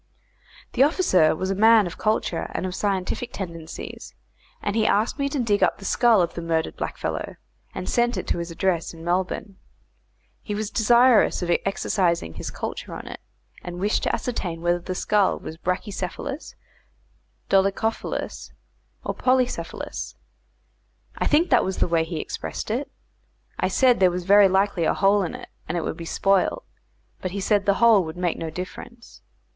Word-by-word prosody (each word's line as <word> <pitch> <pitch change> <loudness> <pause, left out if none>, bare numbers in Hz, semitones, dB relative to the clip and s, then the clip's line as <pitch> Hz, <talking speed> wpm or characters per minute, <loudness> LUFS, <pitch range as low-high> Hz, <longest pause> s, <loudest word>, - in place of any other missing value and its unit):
The 250 - +1
officer 270 - +4
was 190 +4 -2
a - - +2
man 220 +1 +6
of 175 - -7
culture 215 -5 0
and - - -1
of 185 - -3
scientific 200 +5 -2
tendencies, 165 -4 -7 0.4
and 205 0 -2
he 220 -1 +2
asked 220 +7 +1
me 280 0 0
to 285 - -3
dig 210 -4 +1
up - - +3
the 195 - -11
skull 225 -2 +4
of 170 - -3
the 170 - -5
murdered 165 -1 -1
blackfellow, - - -4 0.4
and 185 - -5
sent 240 0 +1
it - - -3
to - - 0
his 170 0 -4
address 170 -1 -1
in 165 - -11
Melbourne. 185 +3 -2 0.8
He 210 - -4
was 210 0 -3
desirous 235 -2 +4
of 175 - -1 0.2
exercising 175 - 0
his - - -6
culture - - -6
on - - -8
it, - - -8 0.4
and 175 0 -6
wished 205 +3 +1
to - - 0
ascertain 180 -9 -4
whether 175 0 +2
the 185 +1 -5
skull 205 +1 +2
was 160 - -8
bracchy 185 +5 -2
cephalous, 200 - -5 0.9
dolichophalous, 195 +3 -1 0.5
or - - -1
polycephalous. 255 -1 -1 1.0
I - - 0
think 320 +4 +3
that 245 - +5
was 190 - -2
the - - +2
way 165 -1 +1
he 165 -1 -4
expressed 210 - -5
it. 260 +6 -2 0.7
I - - +2
said 255 -2 +3
there 185 -1 +6
was 180 0 -4
very 200 +1 +7
likely 190 -2 +1
a - - +2
hole 200 +1 +3
in 175 - -3
it, - - -10 0.2
and 175 - -1
it - - 0
would - - -3
be 170 - -8
spoiled; 195 - +1 0.6
but 185 - -2
he 200 +3 -4
said 200 +1 +1
the 200 - +4
hole 230 -4 +5
would 160 +1 -7
make 180 -2 -1
no 165 - -3
difference. 185 +7 -9
195 Hz, 175 wpm, -24 LUFS, 175-225 Hz, 1.0 s, very